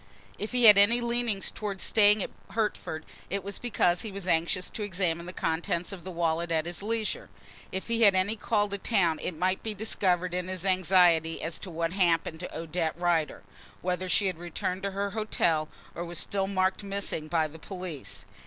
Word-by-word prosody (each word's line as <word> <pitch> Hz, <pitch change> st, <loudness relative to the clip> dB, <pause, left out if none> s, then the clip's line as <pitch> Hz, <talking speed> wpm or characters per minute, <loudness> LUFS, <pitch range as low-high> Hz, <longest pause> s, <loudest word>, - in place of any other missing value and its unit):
If 210 Hz, -, -3 dB
he 250 Hz, -1 st, +1 dB
had 210 Hz, -3 st, +10 dB
any 230 Hz, +4 st, +5 dB
leanings 235 Hz, -4 st, 0 dB
towards 200 Hz, -3 st, -4 dB
staying 210 Hz, -2 st, +5 dB
at -, -, -6 dB, 0.2 s
Hertford 210 Hz, -7 st, -2 dB, 0.2 s
it 200 Hz, 0 st, -2 dB
was 200 Hz, 0 st, -5 dB
because 180 Hz, -7 st, +1 dB
he 220 Hz, -, -5 dB
was 195 Hz, -1 st, -6 dB
anxious 175 Hz, +2 st, +1 dB
to 220 Hz, -, -5 dB
examine 175 Hz, -4 st, -1 dB
the -, -, -4 dB
contents 170 Hz, +1 st, -1 dB
of 185 Hz, -4 st, -8 dB
the 190 Hz, -, -7 dB
wallet 170 Hz, -1 st, -1 dB
at 160 Hz, -1 st, +1 dB
his 175 Hz, +2 st, -3 dB
leisure. 225 Hz, -, -2 dB, 0.4 s
If 190 Hz, -, -4 dB
he 230 Hz, 0 st, 0 dB
had 200 Hz, -4 st, +7 dB
any 185 Hz, +4 st, +1 dB
call 210 Hz, -1 st, +1 dB
to 200 Hz, 0 st, -4 dB
town 175 Hz, -8 st, +2 dB
it 175 Hz, -, -4 dB
might 185 Hz, +3 st, 0 dB
be 220 Hz, -1 st, -3 dB
discovered 185 Hz, -4 st, 0 dB
in 180 Hz, 0 st, -2 dB
his 185 Hz, 0 st, -4 dB
anxiety 180 Hz, -3 st, +4 dB
as 165 Hz, 0 st, -3 dB
to 195 Hz, -, -7 dB
what 165 Hz, 0 st, -2 dB
had 195 Hz, -, -3 dB
happened 165 Hz, -2 st, +2 dB
to 180 Hz, -, -6 dB
Odette 165 Hz, 0 st, -2 dB
Rider; 170 Hz, -3 st, 0 dB, 0.4 s
whether 180 Hz, +1 st, -1 dB
she 200 Hz, -, +3 dB
had 185 Hz, -4 st, -1 dB
returned 175 Hz, +2 st, -3 dB
to 200 Hz, -, -1 dB
her 200 Hz, +1 st, -2 dB
hotel 170 Hz, -7 st, 0 dB, 0.2 s
or 170 Hz, -, -4 dB
was 175 Hz, -1 st, -5 dB
still 195 Hz, +3 st, 0 dB
marked 190 Hz, 0 st, +1 dB
"missing" 195 Hz, -6 st, -3 dB
by 160 Hz, 0 st, +1 dB
the 160 Hz, +2 st, -13 dB
police. 180 Hz, -5 st, -6 dB
185 Hz, 200 wpm, -28 LUFS, 170-200 Hz, 0.4 s, had